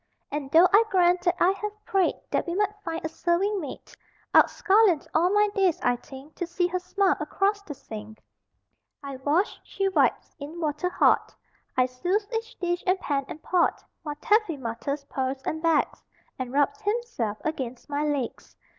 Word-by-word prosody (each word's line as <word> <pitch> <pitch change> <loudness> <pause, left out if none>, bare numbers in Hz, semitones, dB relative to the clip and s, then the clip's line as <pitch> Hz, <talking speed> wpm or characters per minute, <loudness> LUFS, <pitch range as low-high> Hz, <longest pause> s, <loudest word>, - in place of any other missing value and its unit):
And 290 -2 -3
though 335 +5 +7
I 420 +3 +8
grant 360 -1 +3
that 350 0 +3
I 360 - +5
have 420 +2 -6
prayed 385 -2 +2 0.2
That - - 0
we 340 - -2
might 415 +1 +1
find 330 -1 -4
a - - +2
serving 360 +5 0
maid, 285 -5 -8 0.4
I'd - - +7
scullion 395 -5 +4
all 340 +3 +3
my 415 +1 +4
days, 380 -5 +2
I 245 0 +3
think, 270 +4 -12
To 350 - -3
see 350 +1 0
Her 360 +1 -1
smile 375 +1 +1
across 405 +1 0
the 310 -8 -8
sink! 215 -2 -9 0.8
I 275 -1 -6
wash, 295 +9 0
She 390 0 -1
wipes. 380 - +1
In 300 +4 -7
water 310 +2 -1
hot - - +2 0.4
I 255 - +5
souse 355 +12 -1
each 455 +1 -4
dish 350 -1 -2
and 370 +1 +3
pan 280 -5 -1
and 310 - -9
pot; 360 -2 +1 0.2
While 295 -3 -5
Taffy 415 0 +2
mutters, 275 +4 -4
purrs, 265 -1 -3
and 315 - -3
begs, 330 -2 +1 0.4
And 255 -1 -4
rubs 290 +10 +1
himself 415 - -2
against 260 -6 -4
my 290 +1 -1
legs. 285 -5 -3
340 Hz, 180 wpm, -26 LUFS, 280-390 Hz, 0.8 s, I